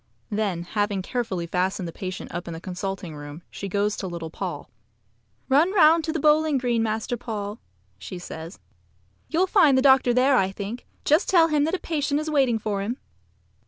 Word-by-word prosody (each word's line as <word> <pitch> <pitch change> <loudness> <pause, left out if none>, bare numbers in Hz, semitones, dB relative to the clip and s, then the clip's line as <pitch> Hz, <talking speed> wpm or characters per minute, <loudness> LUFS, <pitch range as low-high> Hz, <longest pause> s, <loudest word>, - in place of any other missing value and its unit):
Then, 205 -5 -1
having 205 +1 -1
carefully 210 -7 -2
fastened 180 +1 -1
the - - -5
patient 185 0 -6
up 175 +1 -5
in 170 - -5
the - - -7
consulting 185 -1 -5
room, 145 +3 -9
she 200 - -6
goes 205 +2 0
to 190 - -4
little 170 -2 -6
Paul. 175 -5 -5 0.8
"Run 300 +7 +4
round 330 -3 +6
to 320 - -1
the 325 - -2
bowling 305 0 +3
green, 240 -3 0
Master 220 +2 -1
Paul," 215 -3 -5 0.4
says 170 - -8
she. - - -39
"You'll 340 +3 +2
find 345 -9 +5
the 260 - +3
doctor 265 -2 +5
there, 255 +2 +4
I 190 -3 +2
think. 205 +5 -6 0.2
Just 305 +6 +3
tell 335 -3 +5
him 295 -2 +2
that 325 +4 0
a - - -4
patient 295 -2 -1
is 310 0 -3
waiting 265 -6 +3
for 205 -2 -2
him." 230 +6 -3
220 Hz, 190 wpm, -25 LUFS, 185-285 Hz, 0.8 s, round